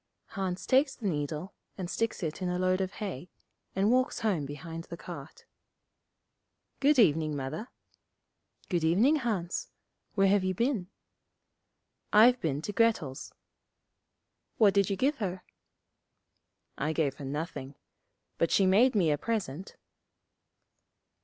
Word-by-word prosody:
Hans 190 -2 -3
takes 270 +1 +3
the 225 - -9
needle, 155 +2 -3 0.2
and 185 -3 -4
sticks 225 +1 -2
it 160 +2 -3
in 180 - -1
a 180 - -1
load 185 +1 +1
of 190 0 -2
hay, 180 -5 -6 0.5
and 195 +3 +3
walks 255 -1 +1
home 185 -11 0
behind 165 +4 -7
the 170 - -8
cart. - - -10 1.3
'Good 285 +1 +4
evening, 155 - +3
Mother.' 145 - -5 1.0
'Good 175 -4 0
evening, 215 - +4
Hans. 205 - -2 0.5
Where 195 -1 +4
have 200 0 +3
you 185 0 0
been?' 230 -4 0 1.2
'I've 245 +4 +6
been 150 -2 -1
to 205 - -4
Grettel's.' 200 - 0 1.3
'What 205 -3 +5
did 200 -2 +3
you 200 - 0
give 275 +8 +1
her?' 185 -3 -3 1.4
'I 155 +3 0
gave 150 -4 0
her 140 - -7
nothing. 140 -1 -5 0.6
But 165 - +2
she 195 - +4
made 220 +7 +4
me 170 -7 +3
a 145 - 0
present.' 195 -6 -3
185 Hz, 135 wpm, -30 LUFS, 160-220 Hz, 1.4 s, I've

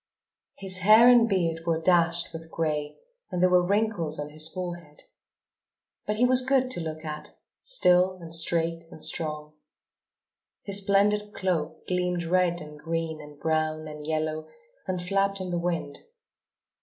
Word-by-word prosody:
His 190 -1 0
hair 215 +6 +7
and 240 -2 +6
beard 165 -4 -1
were 165 -1 +1
dashed 170 0 +2
with 165 0 -9
gray 150 -3 -3 0.3
and 180 - -4
there 180 0 +3
were 180 0 +5
wrinkles 195 -5 0
on 145 0 -5
his 155 +1 0
forehead. 175 -5 -7 1.0
But 210 - 0
he 240 +3 +3
was 255 0 +5
good 260 0 +1
to 240 - 0
look 160 -1 -6
at, 150 0 -8 0.2
still 185 - +4
and 165 -1 -10
straight 165 0 +1
and 160 - -9
strong. 150 -2 -2 1.1
His 200 -1 +2
splendid 210 +1 +1
cloak 165 -4 -3
gleamed 180 -1 -1
red 175 0 +1
and 150 -1 -11
green 165 -1 -4
and 150 -1 -14
brown 155 0 -1
and 150 0 -9
yellow 155 0 -3 0.4
and 185 -1 -2
flapped 195 +2 0
in 185 -1 -5
the 175 - -1
wind. 170 -4 -3
170 Hz, 155 wpm, -26 LUFS, 155-190 Hz, 1.1 s, hair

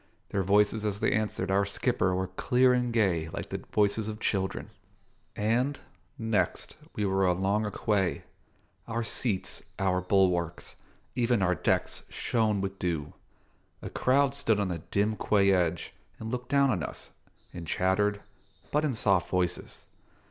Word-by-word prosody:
Their 100 - 0
voices 105 +3 +3
as 105 -1 -1
they - - +2
answered 105 -3 -1
our 100 +1 +3
skipper 100 -2 0
were 95 +1 0
clear 125 +7 +3
and 125 -1 +1
gay 90 -8 +1
like - - -6
the - - -5
voices 105 +1 +2
of 110 0 -5
children. 95 -4 -2 0.6
And, 120 +7 +1 0.4
next, 110 -3 -1 0.2
we 105 - 0
were 95 0 +1
alongside 95 +4 +1
a - - -9
quay. 100 -4 +1 0.6
Our 115 0 -2
seats, 110 -3 -2 0.2
our 90 -1 +1
bulwarks, 90 -3 +1 0.4
even 120 -4 +2
our 90 0 +3
decks, 85 - 0
shone 110 -4 0
with 95 0 -4
dew. 80 -5 -2 0.7
A - - -6
crowd 135 +1 +2
stood 115 -7 +1
on 100 -2 0
the 85 -2 -3
dim 105 +6 0
quay 100 -2 +3
edge 85 -3 0 0.2
and 110 0 -6
looked 125 0 -4
down 140 -1 +4
on 90 -7 -1
us, - - -5 0.4
and 85 -2 -7
chattered, 100 +5 +1 0.5
but 150 +1 +2
in 150 -4 +1
soft 100 -5 +2
voices. 90 -1 -2
100 Hz, 155 wpm, -29 LUFS, 95-115 Hz, 0.7 s, down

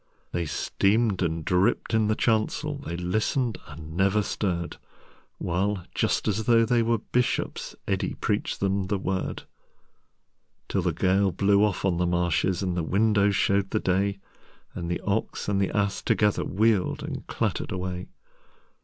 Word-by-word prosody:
They 85 -2 -2
steamed 100 +4 +1
and 80 -2 -1
dripped 90 +5 +1
in 110 -1 +3
the 110 - +2
chancel, 120 +8 0
They 85 -11 -5
listened 110 +7 0
and 80 +2 -9
never 100 +3 +3
stirred, 85 -5 -2 0.6
While, 95 +1 -1
just - - 0
as 105 +1 0
though 115 -1 +5
they 120 0 +3
were 115 0 +2
Bishops, 125 +3 -1
Eddi - - -1
preached - - -2
them 100 -1 0
The 100 +1 0
Word, 95 0 -3 1.2
Till - - 0
the - - +1
gale 95 +1 +2
blew 100 +3 +3
off 105 -2 0
on 90 -3 +2
the 90 0 +1
marshesAnd 90 +2 +1
the 85 - -1
windows 100 +3 +2
showed 100 +2 +2
the - - 0
day, 100 +2 +1 0.6
And 85 -1 -5
the 85 - -1
Ox 100 +2 -2
and 100 -1 +1
the 95 - +1
Ass 100 -1 0
togetherWheeled 105 -1 +1
and - - -6
clattered - - -2
away. 90 -1 -4
100 Hz, 150 wpm, -26 LUFS, 90-105 Hz, 1.2 s, though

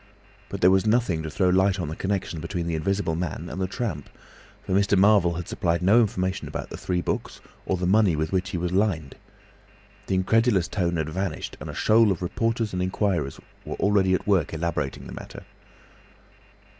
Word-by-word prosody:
But - - -6
there 90 - +6
was 95 +2 +3
nothing 110 -8 +2
to 80 - -5
throw 90 +4 +1
light 95 +1 +3
on 85 - -2
the 80 - -5
connexion 95 -3 -2
between 85 +2 -4
the 85 - -2
Invisible 95 +2 -1
Man 85 0 -4
and 95 - -4
the 95 - 0
Tramp; 95 - -4 0.6
for - - -5
Mr. 100 +1 +3
Marvel 95 -3 +4
had 85 0 -5
supplied 85 0 -1
no 105 +6 +6
information 95 -3 -1
about - - -6
the - - -5
three 90 -1 -1
books, - - -3 0.3
or 95 - +1
the 90 - -2
money 100 -2 +4
with 80 +1 -2
which 95 0 0
he 100 - -3
was 85 +1 -2
lined. 90 -7 0 0.9
The 95 - 0
incredulous 100 0 +2
tone 85 -4 -1
had 80 -1 -2
vanished 95 0 -4
and - - -7
a - - -7
shoal 110 -1 +4
of 90 -1 -2
reporters 115 +3 -1
and 90 - -1
inquirers 90 -6 -1 0.2
were - - -5
already 100 -2 +3
at - - -4
work 95 -5 +1
elaborating 75 -4 -3
the - - -9
matter. - - -10
95 Hz, 195 wpm, -25 LUFS, 85-100 Hz, 0.9 s, there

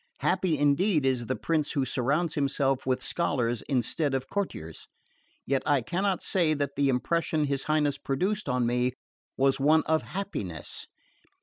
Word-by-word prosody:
Happy 170 -5 +1
indeed 145 +3 +2
is 125 -3 0
the 130 - 0
prince 155 -3 -1
who 140 -4 +1
surrounds 140 +7 0
himself 135 -2 0
with 130 -1 0
scholars 120 -9 0
instead 135 +2 0
of 135 0 -3
courtiers! 80 - -4 0.6
Yet 135 0 +1
I 140 -4 +2
cannot 185 - -1
say 165 -5 +2
that 140 -1 -2
the 140 -1 +2
impression 155 +4 +1
his 140 -1 -2
Highness 150 -2 +1
produced 190 +7 -1
on 125 -2 +1
me 125 +1 +1 0.4
was 135 0 +2
one 155 +3 +4
of 160 0 +2
HAPPINESS. 150 - -5
140 Hz, 150 wpm, -28 LUFS, 130-160 Hz, 0.6 s, one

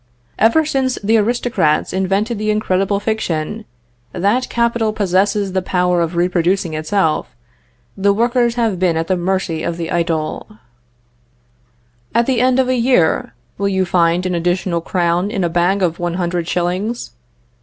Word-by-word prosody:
"Ever 230 +9 +4
since 265 -4 0
the 220 +3 +3
aristocrats 230 -8 +1
invented 195 +4 0
the 215 0 -1
incredible 200 -2 +1
fiction, 210 -1 -3 0.5
that 205 +8 0
capital 235 -2 0
possesses 200 0 +1
the 190 - +1
power 180 -1 +1
of 170 +1 -2
reproducing 175 0 +1
itself, 155 - -1 0.6
the 200 +1 +2
workers 235 +2 +1
have 225 -6 0
been 175 -3 +1
at 165 - -1
the 185 - 0
mercy 180 -2 -1
of 170 0 -3
the 165 -1 -4
idle. 165 +4 -2 1.6
"At 235 - +3
the 255 -2 +1
end 255 0 +3
of 260 -1 +2
a 255 - +1
year, 230 - +1 0.2
will 200 0 +1
you 190 -1 +1
find 175 0 +2
an 185 - -1
additional 175 0 0
crown 175 +2 0
in 205 -4 -2
a 170 - +1
bag 180 +3 +1
of 170 -2 0
one 175 -1 -2
hundred 175 -2 -2
shillings? 180 - -2
190 Hz, 155 wpm, -17 LUFS, 175-220 Hz, 1.6 s, Ever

